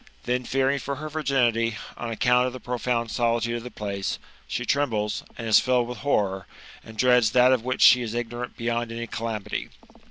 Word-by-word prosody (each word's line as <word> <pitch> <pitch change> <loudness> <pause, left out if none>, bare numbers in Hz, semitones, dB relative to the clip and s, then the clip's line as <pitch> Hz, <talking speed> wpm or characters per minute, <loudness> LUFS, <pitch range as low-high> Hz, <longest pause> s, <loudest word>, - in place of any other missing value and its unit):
Then, 125 0 -1
fearing 135 +2 +1
for 140 - -4
h^r 155 +2 -7
virginity, 120 -7 +1 0.2
on 120 - -5
account 125 +2 +3
of 125 - -5
the 130 - -7
profound 120 -1 -2
solitude 120 0 0
of - - -6
the 125 - -7
place, 100 -4 -4 0.3
she 120 - -3
trembles, 115 -7 0
and 115 - -5
is 110 - +7
filled 125 -2 +1
with 120 -2 -7
horror, 100 -9 0 0.4
and 110 0 -12
dreads 125 -2 +4
that 125 +1 +6
of 125 -3 0
which 130 +1 0
she 125 - +8
is 115 -1 -4
ignorant 120 +1 -4
beyond 120 0 -2
any 115 0 -4
calamity. 110 -2 -4
120 Hz, 190 wpm, -25 LUFS, 115-125 Hz, 0.4 s, she